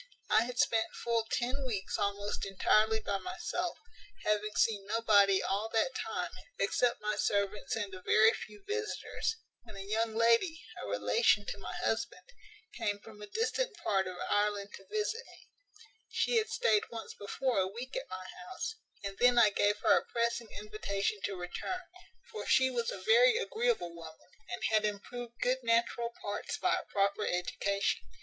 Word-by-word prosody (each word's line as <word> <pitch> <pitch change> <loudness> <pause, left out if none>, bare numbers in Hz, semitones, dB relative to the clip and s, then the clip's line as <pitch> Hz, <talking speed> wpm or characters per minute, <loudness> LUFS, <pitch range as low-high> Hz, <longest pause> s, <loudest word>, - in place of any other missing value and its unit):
"I 220 +2 +5
had 245 0 -6
spent 225 -1 +2
full 230 -1 0
ten 255 +3 -1
weeks 210 -7 -2
almost 200 0 -1
entirely 215 +3 +3
by 200 -2 -1
myself, 355 - -3 0.5
having 210 0 0
seen 205 -3 +2
nobody 205 -3 +4
all 205 +3 -1
that 230 +4 +2
time, 180 -8 -3 0.3
except 235 +3 +1
my 210 0 0
servants 200 0 0
and 205 -3 -3
a 185 - -8
very 220 +4 +5
few 210 -1 -9
visitors, 435 +1 -2 0.3
when - - -13
a 195 - -6
young 220 +2 0
lady, 235 +9 +3 0.2
a - - -5
relation 105 - +3
to - - -4
my - - -6
husband, 225 - -1 0.5
came 205 -1 -1
from 210 0 -14
a 210 - -7
distant 455 - -1
part 195 -2 +1
of 185 -1 -6
Ireland 205 -1 +1
to - - -18
visit 430 +2 -1
me. - - -17 0.6
She 480 - +1
had 445 0 +1
staid 220 - +2
once 225 -3 -7
before 240 +3 -1
a 190 - +2
week 240 +7 -7
at - - -4
my 185 0 -6 0.2
house, 375 - -4 0.3
and 195 0 -5
then 245 0 +5
I 215 -3 +7
gave 205 +1 +2
her 215 -3 +6
a - - -11
pressing 235 -1 0
invitation 210 0 -2
to 195 - -3
return; 185 - -4 0.5
for 435 - -6
she 260 0 +4
was 235 -2 -1
a - - -4
very 470 0 +5
agreeable 470 - 0
woman, 165 +1 -12 0.2
and 240 - -5
had 215 -1 +4
improved 235 +3 -4
good 255 +1 +2
natural 235 0 +1
parts 205 0 -3
by - - +2
a - - -10
proper 200 +1 +1
education. 200 +2 0
215 Hz, 170 wpm, -32 LUFS, 200-245 Hz, 0.6 s, I